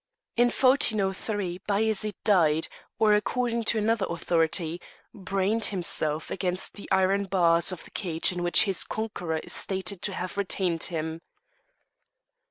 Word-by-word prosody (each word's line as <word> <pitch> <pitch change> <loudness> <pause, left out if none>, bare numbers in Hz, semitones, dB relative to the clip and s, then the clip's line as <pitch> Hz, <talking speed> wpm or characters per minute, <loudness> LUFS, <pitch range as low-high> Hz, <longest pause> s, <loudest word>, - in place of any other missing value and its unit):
In 240 +1 +4
1403 205 -7 +1
Bajaret 215 0 +1
died, 165 -6 +3 0.3
or, 215 -1 +4
according 235 +2 -1
to 225 - +2
another 215 -2 0
authority, 170 0 0 0.3
brained 195 +2 -1
himself 160 -5 0
against 185 -1 -1
the 205 - -9
iron 190 +1 +2
bars 170 -2 +3
of 180 -3 -7
the - - -16
cage 170 -4 +1
in 180 -1 -5
which 175 +5 +4
his 195 -4 +1
conqueror 180 -7 -4
is - - -4
stated 190 -1 -1
to 200 - -3
have 185 +1 -5
retained 185 -4 0
him. 160 0 -4
190 Hz, 135 wpm, -26 LUFS, 175-210 Hz, 0.3 s, In